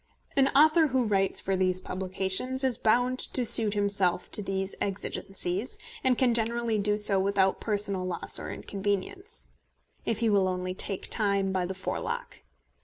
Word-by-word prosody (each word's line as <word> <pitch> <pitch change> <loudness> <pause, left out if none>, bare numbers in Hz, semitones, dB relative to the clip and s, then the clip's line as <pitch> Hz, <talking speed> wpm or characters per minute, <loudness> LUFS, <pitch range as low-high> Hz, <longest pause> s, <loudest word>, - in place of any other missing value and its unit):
An 270 -1 +4
author 315 +2 +5
who 260 -2 +1
writes 195 -2 +1
for 195 - -1
these 185 -1 +1
publications 190 +8 -2
is 260 -2 +1
bound 245 +3 +2
to 250 - 0
suit 215 -2 +6
himself 200 -3 0
to - - +1
these 195 -1 -2
exigencies, 195 +1 -2 0.3
and 255 -2 +2
can 250 -2 +3
generally 230 -1 0
do 210 +1 0
so 205 -2 +3
without 195 0 +1
personal 205 -3 -1
loss 180 -2 -1
or - - -6
inconvenience, 205 - -3 0.5
if 225 - -1
he 230 0 0
will 195 -2 +3
only 185 0 -3
take 190 +1 -2
time 200 -3 +2
by 185 -2 -1
the 190 - -5
forelock. 185 - -5
200 Hz, 160 wpm, -28 LUFS, 190-235 Hz, 0.5 s, suit